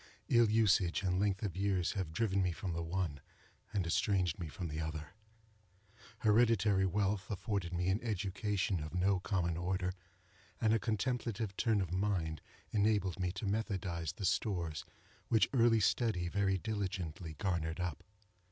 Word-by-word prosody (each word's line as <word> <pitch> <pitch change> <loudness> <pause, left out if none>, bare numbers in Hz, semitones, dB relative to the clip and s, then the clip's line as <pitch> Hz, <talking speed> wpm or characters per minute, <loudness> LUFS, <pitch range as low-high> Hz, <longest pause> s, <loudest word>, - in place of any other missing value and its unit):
Ill 120 -2 +5
usage 105 -4 +3
and 90 -1 +1
length 100 0 +1
of 100 -5 -2
years 95 -2 +1
have 95 -5 -3
driven 100 +1 +1
me 90 -1 +2
from 85 +2 -4
the 85 - -2
one, 85 -3 -2 0.5
and 95 -4 0
estranged 90 0 +1
me 85 - -3
from 85 +4 -5
the 75 0 -4
other. 80 -1 -4 1.1
Hereditary 105 -3 +4
wealth 100 +1 0
afforded 100 -3 -2
me 90 0 -1
an 95 +3 +1
education 100 -3 -1
of 75 +3 -6
no 95 +1 +2
common 90 -3 -1
order, 90 +1 -1 0.7
and 110 -1 +3
a 115 - +3
contemplative 110 -1 -1
turn 110 -2 +2
of 90 -3 -3
mind 90 -6 0 0.3
enabled 100 -3 +1
me 90 -1 0
to 95 +2 -5
methodize 95 -6 -2
the 100 - -4
stores 85 -7 -1 0.4
which 110 - +3
early 115 -3 +5
study 105 -4 +1
very 95 0 +1
diligently 95 -6 -4
garnered 85 -3 -1
up. 90 -4 -3
95 Hz, 150 wpm, -35 LUFS, 85-105 Hz, 1.1 s, Ill